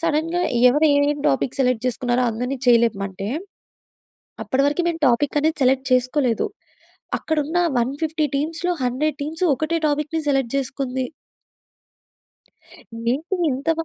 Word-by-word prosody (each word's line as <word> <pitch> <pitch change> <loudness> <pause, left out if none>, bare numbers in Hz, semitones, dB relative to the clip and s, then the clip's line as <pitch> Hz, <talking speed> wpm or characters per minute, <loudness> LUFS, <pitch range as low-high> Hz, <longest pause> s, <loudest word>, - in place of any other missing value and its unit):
సడెన్‌గా 330 +2 0 0.3
ఎవరు 295 +5 +3
ఏమి 285 0 +3 0.2
టాపిక్ 140 - -1
సెలెక్ట్ 250 -2 +1
చేసుకున్నారో 245 0 0
అందరిని 250 +4 -3
చేయి 235 -1 +6
లేపమంటే, 195 -3 -3 1.1
అప్పటి 270 +1 0
వరకు 295 +5 +1
మేము 330 -1 -3
టాపిక్ 275 +5 +1
అనేది 315 +2 0
సెలెక్ట్ 265 +1 +2
చేసుకోలేదు. 255 - +1 0.7
అక్కడ 315 - -2
ఉన్న 320 +5 -1 0.2
150 300 +6 -1
టీమ్స్‌లో 330 +5 -1
100 270 +4 0
టీమ్స్ 320 +5 -3
ఒకటే 310 +4 -1
టాపిక్‌ని 300 +2 -1
సెలెక్ట్ 270 -4 +1
చేసుకుంది. 260 -1 -2 2.1
ఏంటి 330 +8 -2
ఇంత 275 +5 -1
275 Hz, 120 wpm, -22 LUFS, 250-315 Hz, 2.1 s, చేయి